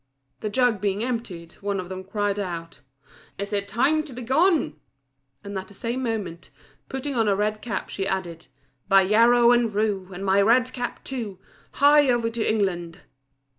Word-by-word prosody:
The 215 - -3
jug 235 -2 +2
being 205 +1 0
emptied, 215 -9 -4
one 200 -1 -2
of 180 - -5
them 185 0 -6
cried 205 +1 -1
out, 165 -6 -5 0.6
"Is 200 +1 -5
it 200 -1 -1
time 260 +9 +2
to 280 - -10
be 250 +1 -7
gone?" 275 - +2 0.6
and 200 0 -7
at 190 0 -4
the 200 - -15
same 240 +5 -3
moment, 210 -8 -4 0.4
putting 270 +1 -4
on 225 -4 +1
a 200 - +3
red 210 +1 -1
cap, 240 - -4
she 195 -1 -3
added 175 -5 -4 0.4
"By 195 -1 +6
yarrow 235 +4 +5
and 240 -2 +3
rue, 205 -3 -1
And 190 +2 -6
my 195 +1 +4
red 250 +5 +3
cap 245 -1 -5
too, 230 -8 -5 0.4
Hie 290 0 +5
over 235 -2 +1
to 230 -1 -2
England." 180 -5 -1
210 Hz, 175 wpm, -24 LUFS, 190-240 Hz, 0.6 s, By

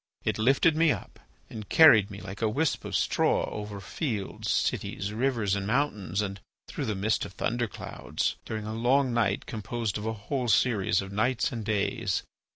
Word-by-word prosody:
It - - -1
lifted 135 +7 +4
me 160 -1 +4
up - - -6 0.3
and 110 -2 -9
carried 115 - +7
me 100 0 -9
like 100 +2 -8
a 110 - +2
wisp 145 +7 0
of - - -3
straw - - +2
over 105 -1 -6
fields, 105 - -4
cities, 100 +2 -1
rivers, 115 -4 0
and 100 -1 -3
mountains, 105 -6 0
and 100 -1 -5 0.3
through - - -4
the 105 - -1
midst 105 +3 0
of 100 - -7
thunder 120 +3 -1
clouds, - - -3
during 110 -1 -5
a 110 - -4
long 125 +3 +2
night 105 -4 +1
composed 110 -1 -3
of 105 - -4
a 110 - -1
whole 125 +4 -3
series 105 -4 +2
of 95 - -9
nights 115 +6 +1
and 115 -3 -4
days. 105 -1 -1
110 Hz, 180 wpm, -28 LUFS, 100-125 Hz, 0.3 s, carried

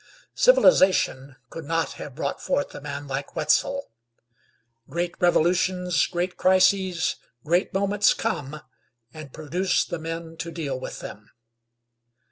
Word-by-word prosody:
Civilization 185 - +4 0.2
could 165 -2 -8
not 165 -1 -1
have 140 - -9
brought 160 - -3
forth 280 +1 -1
a - - -8
man 145 0 -6
like 135 +1 -5
Wetzel. 275 - 0 1.0
Great 170 +4 -2
revolutions, 180 +1 +2
great 180 +1 -3
crises, 185 -1 +2 0.3
great 175 +4 +1
moments 200 +1 +2
come, 150 -9 -3 0.5
and 155 -3 -10
produce 180 +6 -1
the 175 - -5
men 165 0 -6
to 170 - -5
deal 150 -6 -4
with - - -7
them. 105 +1 -10
170 Hz, 120 wpm, -24 LUFS, 150-185 Hz, 1.0 s, Civilization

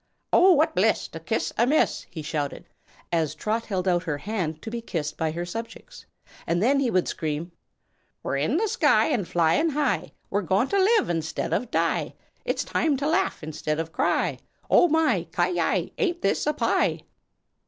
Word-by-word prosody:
"Oh, 370 +1 +7
what 315 +1 +2
bliss - - +2
to - - -8
kiss - - -2
a 235 - +4
miss!" 305 +4 +1
he 160 -3 -7
shouted, 145 -2 -4 0.4
as 160 -3 0
Trot 220 +7 -2
held 190 -3 -2
out 175 -1 +3
her 150 -4 -2
hand 170 -4 -3
to 220 - -6
be 235 0 -4
kissed 155 -8 -4
by 160 - -1
her 170 +3 -4
subjects; 230 - -8 0.4
and 170 +1 +1
then 275 +4 +3
he 265 -3 +1
would 185 -5 +1
scream: 160 +2 -3 0.7
"We're 140 - -1
in 155 - +1
the 440 +4 +1
sky 450 -5 +3
and 225 - 0
flyin' 175 - +2
high: 290 -3 -1 0.2
We're 205 - +1
goin' 195 +7 +1
to 400 - +2
live 435 +3 +3
instead 160 -1 -2
of 250 - -1
die, - - 0 0.3
It's - - -1
time 305 -4 0
to 280 +2 -1
laugh 345 - 0
instead 155 0 -3
of 165 0 -4
cry; - - 0 0.3
Oh, - - +6
my! 310 - +2
ki 175 +1 +2
yi! 175 -1 0
ain't 350 -5 0
this 200 - +1
a 300 - +2
pie!" 300 - +1
200 Hz, 185 wpm, -25 LUFS, -, 0.7 s, Oh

